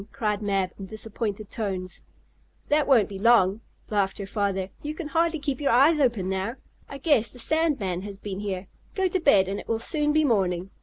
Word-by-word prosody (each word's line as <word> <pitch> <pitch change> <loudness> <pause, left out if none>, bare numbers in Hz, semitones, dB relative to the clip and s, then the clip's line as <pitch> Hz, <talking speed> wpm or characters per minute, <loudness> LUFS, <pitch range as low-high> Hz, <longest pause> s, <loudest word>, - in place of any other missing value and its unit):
cried 210 -2 -1
Mab, 195 -3 0
in 195 - -7
disappointed 215 0 -4
tones. 190 -5 -4 0.7
"That 295 0 +3
won't 240 -8 +5
be 195 -2 -7
long," 215 -2 +4 0.3
laughed 200 -2 +1
her 200 - -5
father. 195 -2 -1
"You 300 +1 -5
can 315 -2 -6
hardly 330 +1 +1
keep 280 -2 -3
your 285 - +1
eyes 285 +6 +5
open 235 -9 +1
now. 190 +5 -2 0.3
I 275 - -7
guess 275 -5 +2
the - - -11
sand 315 +4 +1
man 185 -3 -2
has 200 0 -8
been 195 -1 -6
here. 195 -2 -4 0.3
Go 385 -1 +2
to 370 +1 0
bed, 205 - +4
and 195 +1 -3
it - - -10
will 225 - 0
soon 295 +6 0
be 310 +1 +3
morning. 190 - 0
215 Hz, 205 wpm, -26 LUFS, 195-285 Hz, 0.7 s, won't